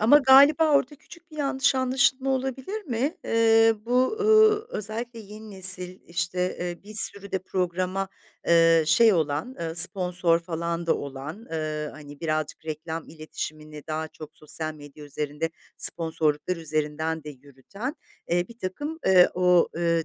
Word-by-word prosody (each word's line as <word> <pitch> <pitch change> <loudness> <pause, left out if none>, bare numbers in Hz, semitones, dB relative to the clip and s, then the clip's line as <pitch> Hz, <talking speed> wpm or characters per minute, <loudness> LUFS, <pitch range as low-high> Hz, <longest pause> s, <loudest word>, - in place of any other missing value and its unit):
ama 235 +7 +6
galiba 285 +3 +6
orada 285 0 +2
küçük 340 +3 -17
bir 305 - -13
yanlış 275 -2 +1
anlaşılma 260 +1 +1
olabilir 265 - -3
mi? 265 +3 -2
Eee, 225 0 +4
bu, 255 - +1
ııı, 435 0 +4
özellikle 230 - -5
yeni 215 +1 -11
nesil, 185 -1 0
işte, 180 +1 -2
eee, 175 -1 -5
bir 215 - -11
sürü 200 -2 +5
de 190 - +1
programa, 185 +1 -2 0.4
eee, 165 -1 +5
şey 215 +8 +5
olan, 160 - -1
ııı, 165 0 -4
sponsor 180 -1 +2
falan 170 0 -4
da - - +3
olan, 145 - -8
ııı, 155 -1 -3
hani, 145 0 -13
birazcık 155 -1 -3
reklam 160 +1 -6
iletişimini 155 -1 -8
daha 155 0 -3
çok 155 -1 -11
sosyal 155 +1 -6
medya 145 0 -13
üzerinde 150 +2 -4 0.3
sponsorluklar 160 +1 0
üzerinden 155 0 -3
de 150 - -7
yürüten, 145 - -8 0.4
eee, 175 +1 +1
birtakım, 235 +8 -6
eee, 185 -2 +6
o, 180 -1 +3
eee, 170 -1 +1
180 Hz, 145 wpm, -25 LUFS, 155-235 Hz, 0.4 s, ama